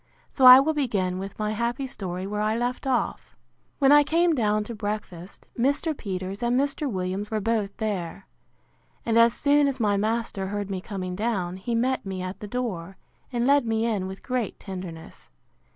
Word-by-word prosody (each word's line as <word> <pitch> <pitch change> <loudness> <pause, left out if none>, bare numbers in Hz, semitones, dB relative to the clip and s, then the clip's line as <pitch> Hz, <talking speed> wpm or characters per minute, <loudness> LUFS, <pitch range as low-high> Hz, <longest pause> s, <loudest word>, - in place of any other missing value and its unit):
So 265 - +2
I 255 +1 +12
will 310 +4 +1
begin 200 -11 -1
with 195 +1 -7
my 215 0 -1
happy 235 +4 -2
story 185 -7 -5
where 210 +1 -3
I 215 +1 +1
left 245 +3 -2
off. 260 -2 -1 0.4
When 275 -1 +4
I 295 0 +8
came 335 +3 +2
down 215 -5 +1
to 235 - -7
breakfast, 205 -4 -6
Mr. 285 +6 0
Peters 190 -2 -5
and 240 +1 +2
Mr. 285 +1 -1
Williams 190 +2 -3
were 220 - -1
both 210 -2 -1
there. 195 -4 -3 0.8
And 230 0 +3
as 230 0 +6
soon 285 0 +3
as 270 -1 -2
my 205 -3 +2
master 215 -2 -1
heard 205 0 -4
me 190 -1 -3
coming 185 -3 -5
down, 190 -4 -2
he 230 +5 -3
met 255 +3 0
me 190 -2 -5
at 185 +1 -6
the 210 - -7
door, 195 -6 -4 0.3
and 240 -1 0
led 280 -2 +4
me 225 0 +1
in 205 -5 -1
with 190 +1 -9
great 250 -4 -2
tenderness. 180 -4 -9
215 Hz, 185 wpm, -25 LUFS, 190-250 Hz, 0.8 s, I